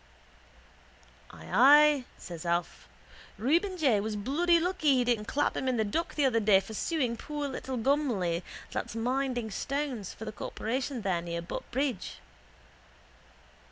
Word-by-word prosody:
—Ay, 290 0 +5
says 170 -3 -8
Alf. 170 0 -2 0.5
Reuben 340 - +1
J 265 - +3
was 215 +1 -3
bloody 325 +11 +2
lucky 330 -5 +2
he 250 - +3
didn't 235 -3 0
clap 290 +1 0
him 265 - -2
in 255 -2 +1
the 220 - +2
dock 325 +12 -2
the 290 - +2
other 235 -4 +3
day 205 -3 +5
for 195 +3 -9
suing 255 -1 -1
poor 295 +4 -4
little 265 -1 -5
Gumley 225 - +1 0.3
that's - - -4
minding 245 -1 -1
stones, 265 -4 -3
for 220 - -9
the 215 - -4
corporation 245 +3 -4
there 180 -4 0
near 170 0 -4
Butt 175 - -6
bridge. 260 -4 -2
250 Hz, 145 wpm, -29 LUFS, 210-290 Hz, 0.5 s, Ay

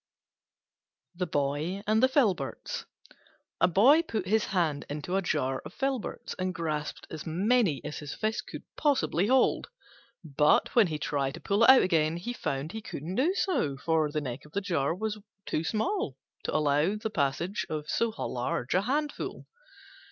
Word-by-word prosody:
THE 180 0 -3
BOY 150 +6 -1
AND 215 +1 +3
THE 260 - +6
FILBERTS 195 - 0 0.7
A - - +5
Boy 240 - +6
put 220 - -3
his 215 +3 +2
hand 165 -7 0
into 150 +5 -3
a 195 - +2
jar 135 -7 -1
of 150 +6 -10
Filberts, 270 -4 -3
and 185 -1 -1
grasped 155 -3 -3
as 160 0 -6
many 185 - +2
as - - -5
his 150 -1 -6
fist 220 0 -2
could - - -8
possibly 265 - +1
hold. 260 +2 +3 0.5
But 150 -1 +3
when 230 -5 +5
he 155 -2 -3
tried 140 -1 -1
to - - -9
pull 200 +5 +1
it - - +6
out 265 0 +9
again, 165 -2 +2
he 240 +8 -4
found 140 - -3
he 220 - -6
couldn't 165 -3 -6
do 300 - +2
so, 155 - 0
for 160 +1 +1
the 150 +1 -2
neck 130 -1 -5
of 150 - -17
the 200 - +1
jar 165 -6 0
was 215 +2 -3 0.3
too 155 - -1
small 370 - -1 0.3
to - - -2
allow 145 -1 +3
of 200 +7 0
the 220 - -3
passage 165 +5 -1
of 155 -1 -4
so 230 +7 +1
large 125 - -3
a 185 - +3
handful. 290 +7 -2
175 Hz, 175 wpm, -29 LUFS, 150-220 Hz, 0.7 s, out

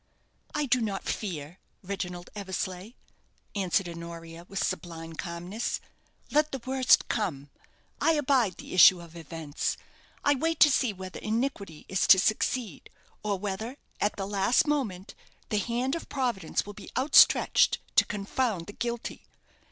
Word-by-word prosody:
"I 300 -1 +1
do 250 -2 +2
not 200 -3 -2
fear, 170 -4 -4 0.2
Reginald 180 -2 -5
Eversleigh," 190 +1 -4 0.6
answered 190 -1 +1
Honoria, 170 0 -9
with 195 - -1
sublime 165 -3 -5
calmness. 175 +7 -4 0.5
"Let 300 +1 +3
the 270 - -4
worst 260 -1 +4
come. 145 -11 -2 0.5
I 325 - +4
abide 260 - +2
the - - -9
issue 185 0 +8
of 170 -1 -12
events. 160 -2 -4 0.5
I 290 - +4
wait 325 +3 -1
to 295 - +8
see 255 -3 +2
whether 185 -1 -8
iniquity 215 - -3
is 190 - +1
to 190 - +9
succeed; 215 - 0 0.3
or 205 -2 -1
whether, 210 +6 -4 0.2
at 205 - +1
the 195 - -3
last 200 +4 +2
moment, 235 - -2 0.4
the 210 - +1
hand 240 +5 -1
of 335 - -4
Providence 240 - -1
will 205 - -8
be - - -11
outstretched 275 +3 +5 0.2
to - - +7
confound 205 -2 -2
the 205 - -9
guilty. 235 +1 -4
200 Hz, 145 wpm, -28 LUFS, 175-245 Hz, 0.6 s, to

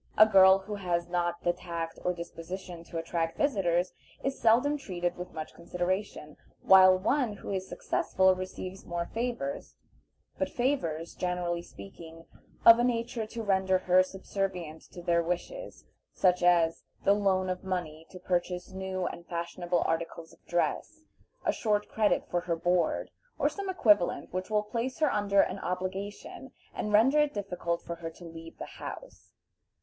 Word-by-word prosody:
A 215 - +10
girl 190 -2 +7
who 195 +2 -7
has 175 -4 -1
not 175 -1 -1
the 175 - +2
tact 170 -2 -5
or 180 - +2
disposition 175 0 -7
to 165 - -7
attract 165 0 -2
visitors 185 -10 +1 0.3
is 270 0 -2
seldom 245 +6 +4
treated 175 -10 -3
with 180 0 -7
much 155 -1 -7
consideration, 175 -2 -3 0.3
while 185 -1 +8
one 245 +4 +1
who 205 - -7
is 190 -1 -3
successful 190 0 +2
receives 185 0 -6
more 170 0 -3
favors, 245 +4 -3 0.6
but - - 0
favors, 210 - -1
generally 180 -1 -2
speaking, 165 - -12 0.4
of 230 0 +10
a - - +3
nature 235 -2 -1
to 230 +1 -6
render 190 -2 +2
her 185 0 +4
subservient 185 -4 -4
to 175 - -10
their 170 0 +3
wishes; 180 - -5 0.3
such 180 -1 +2
as 170 -2 +3 0.2
the 200 - +5
loan 195 -2 +1
of 185 0 -3
money 165 -4 -4
to 185 - -10
purchase 180 0 -2
new 190 -1 -3
and 170 -1 -6
fashionable 175 0 -1
articles 165 0 -3
of - - -23
dress, 175 - -1 0.4
a - - +3
short 210 -2 0
credit 215 -2 +1
for 175 - -1
her 170 -1 -1
board, 175 0 0 0.3
or - - +2
some 395 -1 -5
equivalent 210 - +2
which 185 +1 -3
will 210 -1 +2
place 235 +4 -3
her 310 -3 +2
under 200 -1 +3
an 185 - -2
obligation, 190 +8 -5 0.2
and 210 - -3
render 245 +8 +5
it 295 -3 +2
difficult 175 -4 -3
for 170 - -6
her 165 -1 -5
to 170 +2 -13
leave 165 0 -10
the - - -6
house. - - -10
185 Hz, 160 wpm, -29 LUFS, 170-210 Hz, 0.6 s, A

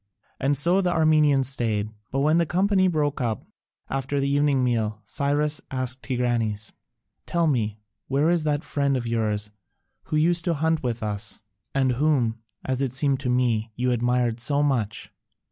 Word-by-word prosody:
And 140 +2 +1
so 175 +7 +3
the 180 -2 +1
Armenians 155 -5 +4
stayed. 110 -5 -1 0.2
But 135 - -1
when 155 +3 +3
the 170 - +1
company 190 +2 +2
broke 150 -5 0
up 115 -4 -2 0.4
after 135 +1 -2
the 140 - 0
evening 140 -1 +2
meal, 110 -4 0
Cyrus 145 +1 0
asked 130 0 -2
Tigranes, 120 -4 -1 0.6
"Tell 170 -1 +1
me, 110 -8 0 0.3
where 145 +5 +2
is 175 -2 +2
that 150 0 0
friend 140 -3 0
of 120 - -4
yours 105 -2 -1 0.5
who - - -3
used 170 +2 +2
to 170 -2 +1
hunt 160 +1 +1
with 120 -2 -3
us, 105 0 -3 0.3
and 135 -1 +3
whom, 125 -4 +1 0.3
as 130 0 -1
it 130 -3 -1
seemed 135 0 +1
to 130 - -3
me, 120 -3 +1
you 125 +1 0
admired 120 -1 +1
so 145 +4 +2
much?" 120 -8 -1
135 Hz, 165 wpm, -25 LUFS, 120-150 Hz, 0.6 s, Armenians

